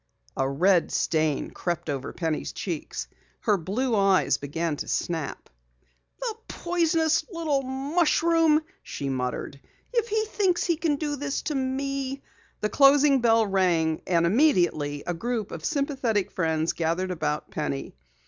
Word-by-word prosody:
A 135 0 0
red 175 +5 +3
stain 155 -3 0
crept 175 -2 -3
over 140 -3 -3
Penny's 160 -3 -2
cheeks. 170 -6 -4 0.3
Her 210 - +3
blue 220 +8 -1
eyes 195 -2 +3
began 155 +3 -2
to - - -5
snap. 160 -4 -3 0.7
"The 470 -3 -3
poisonous 330 -2 +1
little 320 -5 0
mushroom!" 310 +3 +2 0.2
she 140 - -5
muttered. 130 +1 -3 0.3
"If 470 -2 +1
he 435 -1 0
thinks 385 -5 +1
he 340 - +1
can 310 -2 +1
do 290 0 -3
this 280 0 -3
to 305 - -2
me 270 0 -2 0.2
" - - -34
The 210 - 0
closing 275 +2 +5
bell 225 -1 +4
rang, 175 -5 +1
and 170 -2 +3
immediately 175 - +2
a 175 - -1
group 225 +3 -3
of 160 - -7
sympathetic 265 - 0
friends 160 -2 0
gathered 170 +3 -1
about 155 -3 -2
Penny. 150 -3 -3
215 Hz, 140 wpm, -26 LUFS, -, 0.7 s, closing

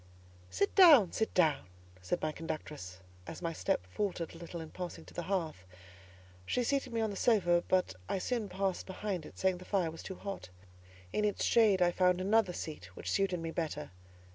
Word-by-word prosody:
"Sit 145 - 0
down—sit 260 - +6
down," 155 - +3 0.3
said 90 - -2
my 155 - +1
conductress, 150 - -6 0.3
as - - -7
my 165 -1 -1
step 90 - -1
faltered 175 - -3
a - - -11
little 170 0 -7
in 160 -1 -8
passing 175 -3 -6
to - - -14
the - - -3
hearth. 170 - -2 0.8
She 245 - 0
seated 275 0 0
me 230 -1 0
on 220 -1 0
the - - -5
sofa, 175 -7 +3
but 185 - +2 0.2
I - - 0
soon 220 +1 -2
passed 190 0 -2
behind 190 -3 -4
it, - - -15
saying 185 -1 +1
the - - -10
fire 185 -4 0
was 165 - -9
too 190 - -7
hot; 195 - -6 0.6
in 210 - +1
its 210 -1 0
shade 210 -6 +5
I 175 - +3
found 180 0 +3
another 200 +1 +3
seat 155 - -6
which - - -4
suited 195 -3 +1
me 165 0 -3
better. 155 - -3
180 Hz, 190 wpm, -33 LUFS, 165-200 Hz, 0.8 s, down—sit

